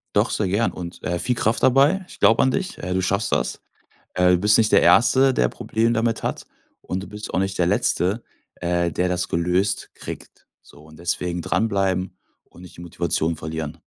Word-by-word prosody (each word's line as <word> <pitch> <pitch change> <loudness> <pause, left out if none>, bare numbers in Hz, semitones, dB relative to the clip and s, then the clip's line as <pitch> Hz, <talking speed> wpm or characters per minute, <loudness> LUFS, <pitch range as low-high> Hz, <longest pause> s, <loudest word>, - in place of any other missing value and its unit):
Doch - - +3
sehr 100 -3 -1
gern 105 +5 +1
und, 85 0 -8
äh, 85 0 -1
viel 125 -2 0
Kraft 110 0 0
dabei. 140 +9 +4
Ich - - -14
glaube 115 - +4
an 130 - +3
dich, 190 +7 -3
äh, 90 +1 -4
du 95 - +1
schaffst 100 +4 -1
das. - - -1 0.6
Du 90 0 +4
bist 105 +4 +4
nicht 110 -1 +3
der - - +6
Erste, 130 +2 +4
der 60 - +2
Probleme 115 +1 -1
damit 115 0 0
hat, - - -3 0.4
und 95 +1 -4
du - - -9
bist 105 +1 -8
auch - - +2
nicht 95 -1 -2
der 90 - +2
Letzte, 100 0 0 0.3
äh 85 -1 -1
der 90 +3 0
das 90 0 -1
gelöst 90 +4 0
kriegt. - - -10 0.2
So, 75 - -18
und 80 +1 -16
deswegen 85 0 -2
dranbleiben 95 -4 -1 0.3
und 90 - -17
nicht 90 - -13
die - - -11
Motivation 85 -1 -2
verlieren. 80 0 -6
95 Hz, 200 wpm, -22 LUFS, 85-110 Hz, 0.6 s, der